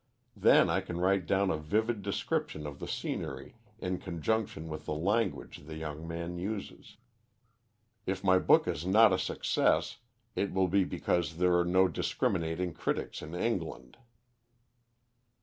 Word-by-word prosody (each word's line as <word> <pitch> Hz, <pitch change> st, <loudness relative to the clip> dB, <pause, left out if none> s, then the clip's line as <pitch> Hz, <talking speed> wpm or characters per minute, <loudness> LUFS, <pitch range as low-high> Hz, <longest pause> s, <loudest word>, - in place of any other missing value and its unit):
Then -, -, +5 dB
I -, -, +1 dB
can 85 Hz, 0 st, -5 dB
write 95 Hz, 0 st, +2 dB
down 95 Hz, 0 st, +2 dB
a 80 Hz, -, 0 dB
vivid 110 Hz, +8 st, 0 dB
description 95 Hz, -5 st, -2 dB
of 70 Hz, -1 st, -7 dB
the -, -, -6 dB
scenery -, -, -4 dB, 0.2 s
in 90 Hz, 0 st, -3 dB
conjunction 90 Hz, -1 st, -2 dB
with 75 Hz, -1 st, -6 dB
the 75 Hz, -, -1 dB
language 100 Hz, +5 st, -1 dB
the 80 Hz, -, -7 dB
young 80 Hz, 0 st, -6 dB
man 85 Hz, +1 st, -4 dB
uses. 100 Hz, +2 st, -6 dB, 1.1 s
If 95 Hz, 0 st, -2 dB
my 95 Hz, -1 st, +5 dB
book -, -, +4 dB
is -, -, -2 dB
not 105 Hz, +3 st, +6 dB
a 95 Hz, -, +1 dB
success, -, -, +1 dB, 0.4 s
it 100 Hz, -, -1 dB
will 95 Hz, 0 st, +2 dB
be 95 Hz, +1 st, +3 dB
because 80 Hz, -3 st, -1 dB
there 90 Hz, 0 st, +3 dB
are 85 Hz, 0 st, +3 dB
no 95 Hz, +2 st, +4 dB
discriminating 80 Hz, +1 st, -1 dB
critics -, -, -3 dB
in 80 Hz, +3 st, -7 dB
England. 90 Hz, -4 st, -3 dB
90 Hz, 150 wpm, -31 LUFS, 80-95 Hz, 1.1 s, not